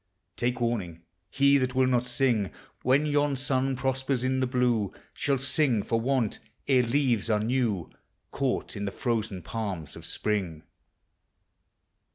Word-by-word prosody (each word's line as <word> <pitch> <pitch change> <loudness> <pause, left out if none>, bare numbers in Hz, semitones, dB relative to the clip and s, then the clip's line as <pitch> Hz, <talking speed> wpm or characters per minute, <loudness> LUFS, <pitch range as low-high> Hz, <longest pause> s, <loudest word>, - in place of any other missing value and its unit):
Take 125 +1 -1
warning! 100 -9 -2 0.3
he 140 0 +4
that 130 0 -1
will 130 0 +4
not 125 -1 +1
sing 120 -5 +1 0.3
When 135 +4 +3
yon 145 -1 +2
sun 135 0 0
prospers 130 0 -1
in 130 0 +1
the 130 - +1
blue, 125 -5 +1 0.2
Shall 140 -1 0
sing 135 -4 +2
for 115 -1 0
want, 125 -3 0 0.3
ere 130 -2 +5
leaves 120 -3 +1
are 105 -1 +3
new, 110 -5 0 0.4
Caught 135 -4 -1
in 100 - -3
the 100 - -2
frozen 110 -7 -2
palms 95 -10 -4
of - - -10
Spring. 95 -7 -2
125 Hz, 145 wpm, -28 LUFS, 110-135 Hz, 0.4 s, ere